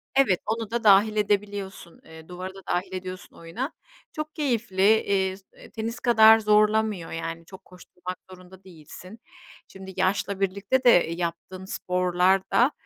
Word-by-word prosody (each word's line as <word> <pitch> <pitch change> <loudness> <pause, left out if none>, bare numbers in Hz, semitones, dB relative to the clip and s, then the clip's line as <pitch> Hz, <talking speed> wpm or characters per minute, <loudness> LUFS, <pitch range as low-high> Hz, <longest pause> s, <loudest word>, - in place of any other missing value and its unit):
Evet, 240 -10 +3
onu 225 0 -3
da 235 -1 -2
dâhil 210 +1 +5
edebiliyorsun, 205 -3 -3
eee, 160 0 -14
duvarı 185 +1 -8
da 195 - -11
dâhil 185 +2 -2
ediyorsun 185 0 -8
oyuna. 180 - -6 0.4
Çok 305 0 -6
keyifli, 235 - -2 0.2
eee, 190 -1 -3
tenis 230 0 -5
kadar 220 -2 +6
zorlamıyor, 210 -3 +1
yani, 165 0 -6
çok 190 +1 -14
koşturmak 180 0 -10
zorunda 185 +1 -15
değilsin. 185 +4 -13 0.5
Şimdi 190 0 -11
yaşla 195 +1 -1
birlikte 200 +7 -1
de 245 - +6 0.3
yaptığın 180 +2 -5
sporlar 180 +1 +1
da, 250 +5 +4
190 Hz, 135 wpm, -25 LUFS, 180-220 Hz, 0.5 s, kadar